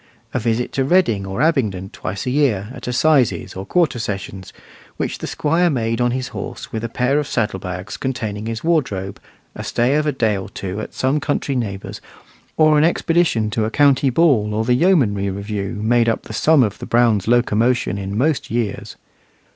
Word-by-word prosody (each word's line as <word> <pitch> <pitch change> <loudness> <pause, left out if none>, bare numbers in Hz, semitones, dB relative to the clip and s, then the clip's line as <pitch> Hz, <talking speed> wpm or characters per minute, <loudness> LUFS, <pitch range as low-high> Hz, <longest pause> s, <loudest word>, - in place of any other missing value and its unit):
A 130 - 0
visit 115 +1 -1
to 135 - 0
Reading 130 - +2
or 95 +8 -1
Abingdon 105 - 0
twice 100 - -5
a 125 - -1
year, 120 -8 +1
at - - -9
assizes 125 - +2
or 95 +1 -6
quarter 165 -9 +1
sessions, 95 -3 -5 0.5
which - - -3
the - - -5
Squire 165 +4 +1
made 115 -4 -1
on 120 - +3
his 130 +1 -3
horse - - -7
with 110 0 -4
a 115 - -3
pair 125 +5 +1
of 145 - -3
saddle 105 -5 -1
bags 90 +2 -6
containing 110 -5 -4
his 115 0 -4
wardrobe, 105 - -1 0.3
a - - -7
stay 120 +3 +1
of 150 +1 +1
a - - +2
day 115 -6 +1
or 95 -1 -5
two 95 +2 -5
at - - -8
some 135 +3 +1
country 145 -2 -2
neighbour's, 100 -6 -4 0.6
or 155 -1 +5
an - - +4
expedition 165 -9 +1
to 110 0 0
a - - -1
county 140 +1 +3
ball 120 -8 +2
or 110 +1 0
the 125 - +3
yeomanry 125 - +2
review, 100 +2 -4
made 115 +1 +3
up 115 - -1
the - - -9
sum 155 -4 +4
of 105 -4 -2
the - - -7
Brown 115 -3 +3
locomotion 120 -3 +2
in 100 +1 -4
most 145 +4 0
years. 115 -3 -3
120 Hz, 195 wpm, -20 LUFS, 105-140 Hz, 0.6 s, or